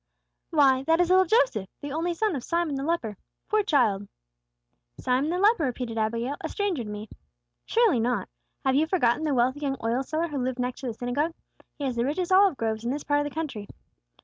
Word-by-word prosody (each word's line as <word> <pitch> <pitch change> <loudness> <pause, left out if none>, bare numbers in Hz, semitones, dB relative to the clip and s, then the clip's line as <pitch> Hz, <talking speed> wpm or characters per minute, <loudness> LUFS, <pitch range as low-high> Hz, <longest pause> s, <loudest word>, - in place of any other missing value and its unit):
"Why, 275 -5 +4
that 325 +1 +4
is 355 -1 +3
little 375 0 +6
Joseph, 255 - +2
the 285 - -6
only 335 +3 -1
son 425 -1 0
of 255 - -4
Simon 340 -3 0
the 270 - -2
leper. 275 - -2 0.3
Poor 430 0 +4
child!" 220 - +2 0.9
"Simon 260 +4 +1
the 350 - 0
leper," 405 -4 +4
repeated 245 -3 -3
Abigail. 230 +5 -1
"A - - -4
stranger 395 - -1
to 210 - -8
me." 210 +1 -6 0.6
"Surely 450 - +3
not. 230 -4 0 0.4
Have 265 - +3
you 300 +4 +3
forgotten 315 -5 +2
the 290 -3 +1
wealthy 255 +3 +2
young 275 -2 -2
oil 235 +3 +1
seller 315 +5 -2
who 290 -2 -3
lived 255 0 -2
next 250 +1 -3
the 245 -4 -4
synagogue? 285 +8 -1 0.4
He 290 - -6
has 255 -3 -2
the 235 - +2
richest 340 +7 -1
olive 380 -5 +5
groves 220 -1 -2
in 235 - -2
this 285 +3 -2
part 290 0 +2
of - - -5
the 290 - -6
country." 270 -11 -4
275 Hz, 210 wpm, -26 LUFS, 240-330 Hz, 0.9 s, little